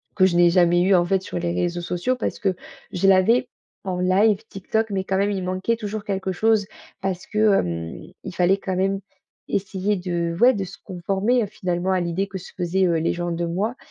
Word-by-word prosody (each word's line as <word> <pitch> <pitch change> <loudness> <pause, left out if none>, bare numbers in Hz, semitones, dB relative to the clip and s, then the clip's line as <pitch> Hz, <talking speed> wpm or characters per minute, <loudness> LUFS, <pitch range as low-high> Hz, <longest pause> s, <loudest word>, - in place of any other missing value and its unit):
Que 185 - +5
je 175 - -1
n'ai 175 0 +6
jamais 175 -1 +4
eu 195 - +4
en 175 - +3
fait 190 +1 +1
sur - - -4
les 170 0 -1
réseaux 175 0 -1
sociaux, 180 +9 -1
parce - - -3
que 195 -4 0 0.4
je 190 +2 +1
l'avais 225 +7 +4 0.4
en 180 -1 -2
live 195 +3 +3
Tik 195 -1 -11
Tok 220 -1 +1
mais 190 -1 -1
quand 190 0 -1
même 200 +1 +1
il 195 -2 -2
manquait 185 +5 -1
toujours 215 -2 -5
quelque 190 -1 -2
chose 215 +2 +2 0.3
parce 185 -2 -3
que, 215 -1 +3
hem, 85 -1 -4 0.2
il - - -6
fallait 180 +2 +3
quand 190 -1 -3
même 195 +1 +1 0.5
essayer 195 +1 -1
de, 170 -2 -2
ouais, 250 +2 +6
de 200 -4 -2
se 180 - -11
conformer, 195 +6 0
heu, 205 - -3
finalement 180 -1 -2
à 185 - +2
l'idée 175 +3 -1
que 195 -1 -6
se 180 - -11
faisaient, 185 +1 +1
heu, 175 - +2
les 165 - +1
gens 175 0 -3
de 170 +1 -2
moi, 200 +8 -2
190 Hz, 225 wpm, -23 LUFS, 175-200 Hz, 0.5 s, n'ai